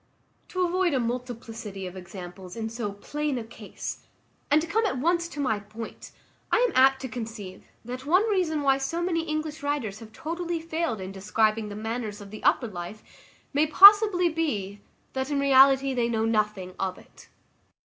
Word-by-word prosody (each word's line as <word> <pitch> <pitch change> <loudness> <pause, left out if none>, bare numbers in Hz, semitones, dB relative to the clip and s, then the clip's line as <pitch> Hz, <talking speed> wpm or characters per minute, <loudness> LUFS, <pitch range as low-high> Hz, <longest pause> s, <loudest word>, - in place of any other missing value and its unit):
To 370 -1 0
avoid 355 -3 +1
a - - +2
multiplicity 230 -4 -5
of 180 0 -7
examples 180 0 -9
in 225 -1 -3
so 225 -2 -4
plain 295 +6 -3
a 235 - -3
case, 225 -2 -8 0.4
and 295 +1 +5
to 320 - -3
come 440 +6 +1
at 385 - -2
once 340 +5 +1
to 300 - -9
my 220 -7 0
point, 215 +3 -9 0.4
I - - +4
am - - +2
apt 265 +1 +5
to 265 - -4
conceive, 220 -5 -7 0.2
that 250 +2 -6
one 370 +8 +4
reason 350 -8 0
why 270 -1 +3
many 340 0 0
English 310 -1 -3
writers 280 -8 -2
have 225 -2 -12
totally 335 +4 -4
failed 320 -7 -2
in 190 +1 -6
describing 215 +2 0
the 205 - -7
manners 220 -1 -4
of 200 0 -11
upper 240 - +3
life, 185 +1 -8 0.5
may 295 +2 +3
possibly 400 +1 +8
be, 215 - -2 0.3
that 265 +1 -2
in 285 -1 0
reality 270 0 +5
they 240 -2 0
know 225 -1 0
nothing 210 -4 -1
of 185 -1 -2
it. - - -17
250 Hz, 175 wpm, -26 LUFS, 215-315 Hz, 0.5 s, possibly